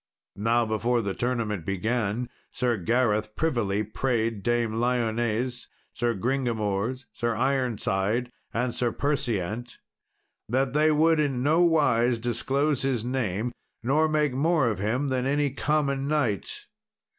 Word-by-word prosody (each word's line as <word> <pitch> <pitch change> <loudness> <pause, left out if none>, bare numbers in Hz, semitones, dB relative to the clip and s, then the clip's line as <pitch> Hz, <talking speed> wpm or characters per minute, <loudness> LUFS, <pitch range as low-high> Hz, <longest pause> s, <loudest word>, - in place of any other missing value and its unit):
Now 115 +3 +2
before 115 +2 0
the 100 -1 -2
tournament 115 -7 -2
began, 110 +5 -1 0.2
Sir 125 -2 0
Gareth 110 +1 +1
privily 110 -10 0
prayed 115 -1 -1
Dame 115 0 0
Lyones, 120 0 0 0.3
Sir 120 -1 0
Gringamors, 120 0 -1
Sir 120 0 -1
Ironside, 120 -3 0 0.2
and 120 +1 -1
Sir 120 -1 0
Perseant, 120 -5 -2 0.7
that 130 +2 +1
they 155 +1 +4
would 160 +1 +4
in 135 -4 0
nowise 145 -7 +3
disclose 135 +4 0
his 130 -4 0
name, 120 -3 -1 0.3
nor 150 +6 +3
make 150 -3 +1
more 145 -1 +2
of 105 -4 -3
him 120 +8 0
than 130 0 0
of - - +1
any 145 -1 +1
common 140 -1 0
knight. 130 - -1
120 Hz, 125 wpm, -26 LUFS, 110-135 Hz, 0.7 s, they